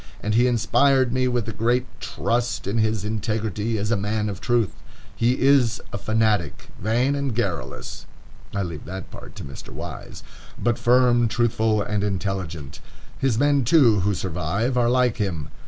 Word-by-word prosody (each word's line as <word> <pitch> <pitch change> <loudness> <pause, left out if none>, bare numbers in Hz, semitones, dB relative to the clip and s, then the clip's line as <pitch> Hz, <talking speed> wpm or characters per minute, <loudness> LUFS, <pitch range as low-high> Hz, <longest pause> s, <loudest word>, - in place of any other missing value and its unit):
And 105 - -2
he 120 +3 +4
inspired 130 +2 +3
me 130 0 +2
with 120 -3 -2
great 120 +2 +2 0.2
trust 120 0 -1
in 100 +4 -1
his 110 -2 0
integrity 110 0 -2
as 105 +2 -2
a - - +4
man 105 +1 -1
of 100 -2 -6
truth. 120 -4 +1 0.4
He 120 +3 +1
is 130 -4 +4
a 100 - -3
fanatic, 110 -7 0
vain 120 +6 +1
and 140 -4 -2
garrulous," 100 -8 -4 0.4
(I 100 - -1
leave 85 -4 -6
that 95 +1 -7
part - - -11
to - - -7
Mr. 70 - -9
Wise) - - -8 0.3
"but 120 0 0
firm, 120 -1 +4
truthful, 110 -2 +1
and 105 0 -1
intelligent. 95 -7 -3 0.4
His 135 -5 +1
men, 145 0 +3
too, 120 -5 +5
who 100 +2 +1
survive, 95 - -2
are 120 -1 +3
like 125 -2 +2
him.... 85 -8 -3
110 Hz, 160 wpm, -23 LUFS, 100-120 Hz, 0.4 s, too